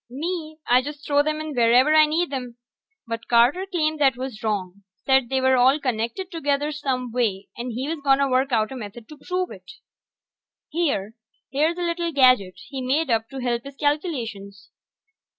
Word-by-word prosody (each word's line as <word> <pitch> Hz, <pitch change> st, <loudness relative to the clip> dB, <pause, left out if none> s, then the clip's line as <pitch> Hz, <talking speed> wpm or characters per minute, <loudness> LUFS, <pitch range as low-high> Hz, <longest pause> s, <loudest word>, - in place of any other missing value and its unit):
Me, 315 Hz, +3 st, -4 dB
I 250 Hz, +1 st, +4 dB
just 290 Hz, +2 st, -8 dB
throw 285 Hz, -1 st, +2 dB
'em 305 Hz, +1 st, +1 dB
in 310 Hz, -1 st, -5 dB
wherever 245 Hz, +4 st, +4 dB
I 310 Hz, -1 st, +6 dB
need 320 Hz, 0 st, -1 dB
'em. 250 Hz, -3 st, -5 dB, 0.5 s
But 230 Hz, 0 st, -5 dB
Carter 245 Hz, +11 st, +3 dB
claimed 310 Hz, -3 st, 0 dB
that 270 Hz, -4 st, +3 dB
was 255 Hz, -4 st, -6 dB
wrong. 200 Hz, -3 st, -3 dB, 0.2 s
Said 265 Hz, -3 st, +3 dB
they 265 Hz, -, +1 dB
were 260 Hz, 0 st, +3 dB
all 260 Hz, +4 st, +4 dB
connected 250 Hz, -, -3 dB
together 290 Hz, -3 st, -1 dB
some 260 Hz, -5 st, -3 dB
way, 220 Hz, -5 st, -1 dB
and 240 Hz, +1 st, -5 dB
he 250 Hz, +4 st, -4 dB
was 325 Hz, 0 st, -3 dB
gonna 275 Hz, 0 st, +3 dB
work 265 Hz, +1 st, +1 dB
out 220 Hz, -1 st, +1 dB
a -, -, -6 dB
method 220 Hz, -1 st, -9 dB
to 305 Hz, -2 st, -12 dB
prove 365 Hz, +3 st, -2 dB
it. -, -, -12 dB, 1.0 s
Here... 280 Hz, -, -1 dB, 0.4 s
here's 310 Hz, +5 st, +1 dB
a -, -, -4 dB
little 340 Hz, 0 st, -1 dB
gadget 255 Hz, -, +4 dB
he 270 Hz, -1 st, -5 dB
made 270 Hz, +3 st, 0 dB
up 225 Hz, 0 st, 0 dB
to 270 Hz, -1 st, -7 dB
help 240 Hz, -1 st, -1 dB
his 275 Hz, 0 st, -10 dB
calculations. 230 Hz, -, -3 dB
265 Hz, 185 wpm, -23 LUFS, 235-305 Hz, 1.0 s, I